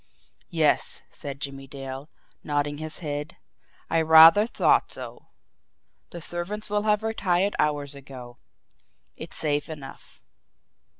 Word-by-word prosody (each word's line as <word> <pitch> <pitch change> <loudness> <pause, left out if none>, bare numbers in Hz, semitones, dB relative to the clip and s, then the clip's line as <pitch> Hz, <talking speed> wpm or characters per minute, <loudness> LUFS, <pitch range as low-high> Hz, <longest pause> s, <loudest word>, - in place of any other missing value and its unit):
"Yes," - - +1
said 140 -1 -8
Jimmie 135 -1 -6
Dale, 135 +1 -8 0.3
nodding 145 0 -1
his 155 +2 -4
head, 145 +3 -4 0.5
"I 165 - +2
rather 160 +6 +8
thought - - +2
so. - - -10 0.8
The 170 - -9
servants 195 +6 -2
will 210 0 +1
have 210 0 +2
retired 200 -3 0
hours 145 -1 0
ago. 130 -3 -11 0.8
It's - - -9
safe 145 -1 -1
enough." 145 -4 -11
150 Hz, 115 wpm, -25 LUFS, 140-175 Hz, 0.8 s, rather